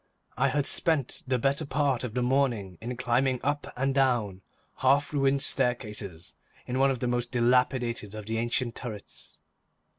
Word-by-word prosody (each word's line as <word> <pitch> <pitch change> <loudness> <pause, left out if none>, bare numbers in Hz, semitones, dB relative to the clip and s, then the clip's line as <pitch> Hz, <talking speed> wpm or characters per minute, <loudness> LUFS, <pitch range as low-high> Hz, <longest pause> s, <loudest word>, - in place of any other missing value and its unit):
I 135 - +2
had 140 +1 0
spent 155 -6 +1
the 130 -1 +1
better 140 +5 +1
part 140 -3 0
of 120 -2 -5
the 125 - +1
morning 120 -9 0
in 120 +2 -5
climbing 125 +1 +1
up 145 +1 -1
and 135 +1 +1
down 120 -8 +1 0.4
half 140 +3 +2
ruined 135 -1 +2
staircases 105 -9 -1 0.3
in 125 +1 -2
one 135 +1 +5
of 130 -3 -2
the 125 - 0
most 120 0 -1
dilapidated 120 -3 +1
of 105 -1 -7
the 115 +1 -2
ancient 120 +1 -1
turrets. 110 -5 -8
125 Hz, 160 wpm, -28 LUFS, 115-135 Hz, 0.4 s, one